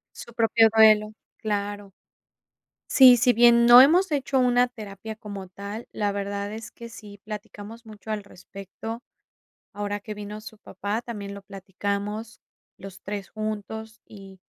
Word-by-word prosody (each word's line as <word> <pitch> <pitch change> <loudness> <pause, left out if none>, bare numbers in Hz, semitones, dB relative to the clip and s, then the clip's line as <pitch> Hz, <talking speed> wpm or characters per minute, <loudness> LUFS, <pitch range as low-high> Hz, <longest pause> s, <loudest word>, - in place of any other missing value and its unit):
Su 235 - -11
propio 225 -1 +4
duelo, 215 -1 +5 0.2
claro. 205 -2 -4 1.0
Sí, 260 -3 +8
si 245 +2 +4
bien 235 0 +5
no 240 +1 +10
hemos 345 +6 +4
hecho 280 -2 -1
una 245 0 +3
terapia 220 -2 -9
como 200 -3 -9
tal, 200 +5 -8
la 205 -1 -1
verdad 200 0 -4
es 220 0 -8
que 235 0 -11
sí, 205 -3 -13
platicamos 215 +1 -9
mucho 220 0 -10
al 210 -2 -3
respecto. 200 +4 -9 0.7
Ahora 205 0 -4
que 210 +1 -8
vino 210 +1 -8
su 220 0 -12
papá, 210 +1 -5
también 205 -4 -7
lo 200 - -11
platicamos 200 +3 -5 0.4
los 195 0 -11
3 200 -1 -6
juntos: 215 +1 -6
"Y 195 -2 -14
215 Hz, 145 wpm, -25 LUFS, 200-225 Hz, 1.0 s, no